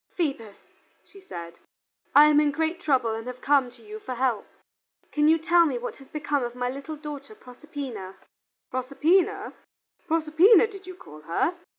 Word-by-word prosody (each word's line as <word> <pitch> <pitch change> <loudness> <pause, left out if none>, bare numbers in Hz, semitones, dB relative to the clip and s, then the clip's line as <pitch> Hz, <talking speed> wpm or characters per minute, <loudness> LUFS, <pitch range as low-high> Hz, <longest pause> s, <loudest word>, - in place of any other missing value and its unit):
"Phoebus" 270 - -2 0.5
she 395 - -17
said, 170 - -9 0.6
"I 295 - +10
am 300 -1 +5
in 300 -1 +3
great 320 +4 -2
trouble 260 -8 +1
and 225 +2 -6
have 250 0 -7
come 275 -2 +2
to 235 -1 -19
you 215 0 -9
for 255 +3 -6
help. 245 -4 0 0.6
Can 300 0 +2
you 320 +1 +5
tell 340 +2 +4
me 265 -4 -2
what 240 - -6
has 270 - -15
become 290 -2 -2
of 240 0 -5
my 250 0 -2
little 280 +4 -7
daughter 295 +5 -9
Proserpina?" 250 - -8 0.6
"Proserpina, 340 +11 +1 0.5
Proserpina 330 +7 +5
did 395 -4 -10
you 370 - -8
call 155 - -13
her?" 170 - 0
285 Hz, 170 wpm, -26 LUFS, 245-325 Hz, 0.6 s, I